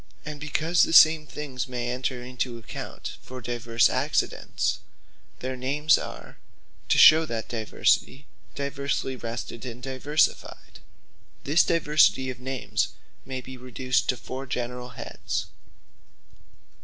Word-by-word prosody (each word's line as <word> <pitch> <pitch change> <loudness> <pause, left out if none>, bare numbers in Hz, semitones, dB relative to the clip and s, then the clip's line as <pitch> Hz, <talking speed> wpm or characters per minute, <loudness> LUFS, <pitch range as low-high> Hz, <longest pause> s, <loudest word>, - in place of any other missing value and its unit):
And 150 -1 -6
because 155 +3 +1
the - - +3
same 155 -1 +7
things 140 -5 -5
may 120 -1 -3
enter 125 0 -3
into 125 -1 -4
account 115 - -7
for 130 0 -9
divers 120 -3 +1
accidents; - - -1 0.6
their 130 +1 -3
names 145 +4 +2
are - - -7 0.5
(to - - +4
shew 160 +1 +8
that 115 -4 -4
diversity) 120 +4 0 0.3
diversly 140 -1 -2
wrested, 120 -1 -6
and 120 -2 -7
diversified. 140 +3 -1 0.6
This 150 +5 +4
diversity 150 -5 +3
of 125 - -10
names 130 0 -2 0.3
may 130 -1 -5
be 130 +1 -10
reduced 125 +1 -1
to 125 - +2
foure 130 +5 -7
generall 125 0 -4
heads. 115 - -4
130 Hz, 120 wpm, -26 LUFS, 125-145 Hz, 0.6 s, shew